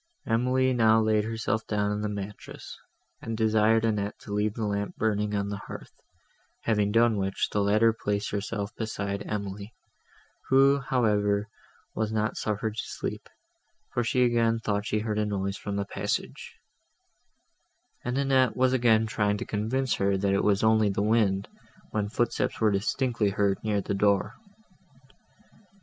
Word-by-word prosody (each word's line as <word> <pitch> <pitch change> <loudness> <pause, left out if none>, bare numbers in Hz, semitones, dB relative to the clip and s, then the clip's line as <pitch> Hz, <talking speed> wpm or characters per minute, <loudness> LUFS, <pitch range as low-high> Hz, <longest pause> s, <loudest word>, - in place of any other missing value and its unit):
Emily 125 +3 +2
now 110 -2 +4
laid 110 -1 +2
herself 110 0 -2
down 105 -1 0
on 105 0 -2
the 105 - -2
mattress, 100 0 -7 0.5
and 115 -1 -4
desired 110 0 +3
Annette 105 -2 -1
to 100 - -7
leave 105 0 0
the 115 - -2
lamp 100 0 -2
burning 105 -1 0
on 100 0 -1
the 100 -1 -5
hearth; - - -9 0.7
having 105 -2 +1
done 115 0 +3
which, 95 -1 -1
the 105 - +1
latter 110 +3 +4
placed 105 -2 -2
herself 105 +2 -3
beside 100 -3 -3
Emily, 100 0 -5 0.7
who, 135 +1 +5
however, 105 -6 +1 0.5
was 110 -1 -2
not 110 0 -1
suffered 105 +1 -2
to - - -1
sleep, - - -6 0.6
for 120 - +1
she 125 +2 +2
again 115 -1 +2
thought 105 -2 -2
she 105 - 0
heard 105 -1 -2
a 105 - +1
noise 100 -1 -2
from 100 -1 -5
the 100 0 -1
passage; - - -4 1.5
and 125 +2 -2
Annette 135 -3 +2
was 130 0 +3
again 115 -3 +4
trying 105 -2 0
to - - -5
convince 120 +5 -1
her, 100 0 +1
that 100 0 +1
it 100 - +1
was 100 0 +2
only 110 -1 +4
the 100 +1 -1
wind, 105 -3 +2 0.4
when 105 -1 -1
footsteps 120 +2 -1
were 110 -2 +3
distinctly 110 +2 0
heard 100 -1 +1
near 105 -2 0
the 100 - -3
door. 100 0 +2
105 Hz, 160 wpm, -27 LUFS, 100-115 Hz, 1.5 s, who